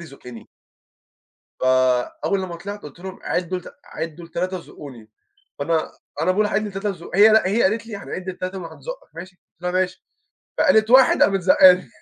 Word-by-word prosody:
يزُقني. 130 -7 -12 1.1
فأوّل 130 +8 +1
لما 175 -2 -6
طلعت، 200 +4 -8
قُلت 150 +3 -12
لهم 190 +1 -8
عِدّوا 180 +1 -2
لت 180 - -13
عِدّوا 165 +1 -7
لتلاتة 180 +3 -3
وزقوني، 130 -10 -12 0.5
فأنا 160 +2 -1 0.3
أنا 180 - +2
باقول 210 +3 +2
هاعِد 210 +1 -1
ل3 195 0 -4
وازُق 180 -4 -7
هي 210 +2 +8
لأ، 220 -3 +4
هي 220 +4 +1
قالت 225 +4 0
لي 215 -3 -6
هنعد 190 -1 -7
ل3 185 +1 -6
وهنزوقك - - -9
ماشي؟ 180 +2 -10
قُلت 175 - -39
لها 180 - -1
ماشي، 185 0 -2 0.5
فقالت 220 -6 +4
1 260 +1 +6
قامت 195 -1 +3
زقاني. 185 0 +5
185 Hz, 165 wpm, -21 LUFS, 165-200 Hz, 1.1 s, هي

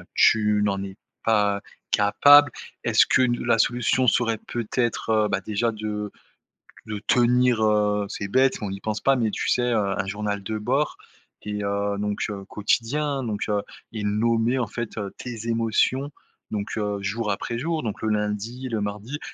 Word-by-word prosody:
tu 105 -1 +4
n'en 100 -1 0
es 95 0 -8 0.3
pas 105 -2 +2 0.3
capable. 145 +7 +6 0.3
Est-ce - - +4
que - - +3
n 120 -2 +1
la 115 -1 +3
solution 125 +2 +2
serait 115 -1 +2
peut-être, 120 0 -2
heu, 110 -1 +3
bah, 100 -1 0
déjà 110 +3 -1
de 105 -1 -4 0.7
de 105 -1 -5
tenir, 125 -1 +3
heu, 105 -1 +2
c'est 100 - -4
bête, 130 +6 +3
on 105 - -3
n'y 95 0 -6
pense 110 -1 -2
pas, 135 - +3
mais 115 -4 0
tu - - -3
sais, 125 - +2
heu, 115 - +2 0.2
un 95 - -1
journal 100 +1 -3
de 110 +3 -3
bord 130 +8 0 0.5
et 105 0 -4
heu, 100 0 -1
donc 105 0 -2
heu, 100 -1 -6
quotidien, 135 +8 0
hein. - - -3
Donc, 110 -4 -2
heu 105 -1 0 0.3
et 110 -2 -4
nommer 115 +4 +1
en 120 - -1
fait, 120 +1 -6
heu, 100 -2 -4
tes 115 -2 -7
émotions 115 +5 +1 0.4
donc, 105 0 -3
heu, 105 -1 -1
jour 105 +2 -2
après 115 +4 -2
jour. 160 +3 -2
Donc 110 -1 -4
le 110 - -1
lundi, 105 +4 -2
le 110 -3 -2
mardi, 105 +8 -4
110 Hz, 180 wpm, -24 LUFS, 105-120 Hz, 0.7 s, capable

